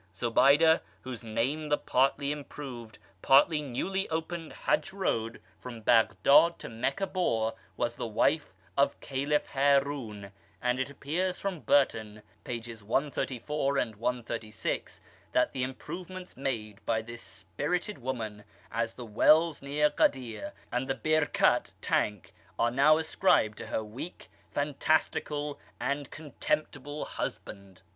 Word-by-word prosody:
Zobayda, 140 +9 +5 0.2
whose 125 -2 -6
name 135 +8 -1
the 145 - +3
partly 140 +2 +1
improved, 135 -6 -7 0.2
partly 150 +3 +5
newly 190 +9 -2
opened 165 0 -3
Hajj - - 0
Road 115 - -1 0.2
from 120 -3 -8
Baghdad 120 +9 +5
to - - -8
Meccah 135 +12 -1
bore, 115 - 0 0.2
was - - 0
the - - -4
wife - - +1 0.2
of - - +2
Caliph 140 +2 0
Harun, 135 -7 +1 0.3
and 125 +1 0
it 130 +1 -1
appears 175 +6 -2
from 195 -4 -3
Burton, 110 -5 +1 0.2
pp. 115 -2 -6
134 135 +3 -1
and 115 -5 0
136, 115 -2 -3 0.3
that - - +3
the 130 - -2
improvements 180 +8 -6
made 115 -6 -4
by 110 -1 +1
this 115 +1 -8
spirited 175 - -3
womanas 110 -3 -4
the 125 - -7
wells 155 +9 +4
near 145 +2 +2
Ghadir, 130 - 0 0.2
and 125 +2 -1
the 135 - 0
Birkat 155 +1 +2
(Tank)are 95 +3 -1
now 145 +4 +6
ascribed 160 - +2
to 115 - -6
her 110 - -2
weak, 120 +11 -8 0.2
fantastical, 150 0 0 0.2
and 140 0 -2
contemptible 145 -1 -3
husband. 95 -1 -6
135 Hz, 120 wpm, -30 LUFS, 115-150 Hz, 0.3 s, now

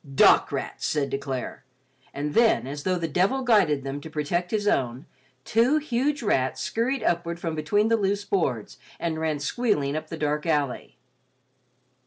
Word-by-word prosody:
"Dock - - +6
rats," - - -3
said 145 -2 -1
De 135 - -1
Clare, 135 -3 -5 0.5
and 145 +1 -4
then 225 - +4
as 145 +2 -5
though 185 +3 0
the 170 -1 -2
devil 190 - +1
guided 205 - +3
them 135 +1 -5
to 160 - -9
protect 160 +4 -2
his 210 0 -1
own, 130 -3 0 0.4
two 240 +7 +3
huge 285 -1 -1
rats 130 - +1
scurried 255 +4 -1
upward 170 0 -1
from 165 -1 -3
between 205 +8 +1
the 230 0 +3
loose 200 0 -1
boards, 130 - -1 0.2
and 165 -2 -2
ran 160 -2 0
squealing 145 - 0
up 155 - -4
the 165 - -5
dark 150 +1 -1
alley. 145 -5 -1
165 Hz, 170 wpm, -25 LUFS, 145-210 Hz, 0.5 s, Dock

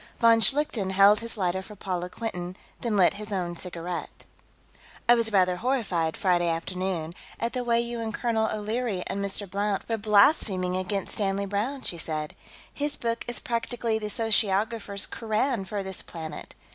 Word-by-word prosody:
Von 230 -1 +5
Schlichten 235 -4 +2
held 200 +2 +7
his 230 0 -6
lighter 185 -1 0
for 210 +2 -11
Paula 180 -2 -3
Quinton, 180 -4 -5 0.2
then 225 -4 0
lit 180 -3 +5
his 210 0 -7
own 175 -3 -2
cigarette. 175 0 -6 0.8
"I 240 - +8
was 230 -2 +2
rather 185 -3 +3
horrified, 195 -10 0
Friday 175 -2 +2
afternoon, 170 0 -2 0.3
at 230 +1 -1
the 250 -1 -1
way 235 -1 +3
you 235 0 -2
and 225 -1 -2
Colonel 225 -2 0
O'Leary 215 -2 -2
and 200 - -2
Mr. 200 +1 -1
Blount 200 +1 -1
were 225 - 0
blaspheming 200 - +3
against 185 +1 -2
Stanley 200 -1 0
Browne," 220 +8 -2
she 170 - -1
said. 155 -1 -3 0.4
"His 290 0 -1
book 230 0 -2
is 240 - 0
practically 230 -1 -1
the 210 -1 -4
sociographers' 215 -1 +1
Koran 225 0 -1
for 200 0 -3
this 190 -1 -2
planet. 160 -2 -8
205 Hz, 165 wpm, -27 LUFS, 185-230 Hz, 0.8 s, I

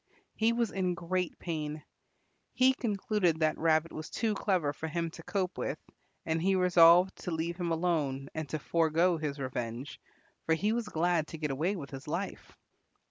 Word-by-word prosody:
He 220 +1 +2
was 235 -2 0
in 185 -2 0
great 180 +1 -2
pain. 155 -3 -4 0.7
He 260 +1 +5
concluded 205 - 0
that 155 0 +2
Rabbit 160 0 +2
was 155 0 -7
too 225 -2 0
clever 185 -8 0
for 160 - -5
him 165 +1 -2
to 165 - -10
cope 185 +1 -2
with, - - -2 0.5
and 160 0 0
he 190 +2 +3
resolved 180 0 +6
to - - -6
leave 170 +1 -2
him 175 -2 -2
alone 155 -5 0
and 155 -3 -4
to 155 - -2
forego 165 +3 +2
his 150 -2 -3
revenge, 130 0 -5 0.5
for 160 - +4
he 210 +6 +1
was 230 -2 -2
glad 170 -2 +1
to 160 - -7
get 150 -2 -2
away 165 +9 0
with 145 -7 -7
his 135 +1 -8
life. 170 +6 -5
165 Hz, 180 wpm, -31 LUFS, 155-185 Hz, 0.7 s, resolved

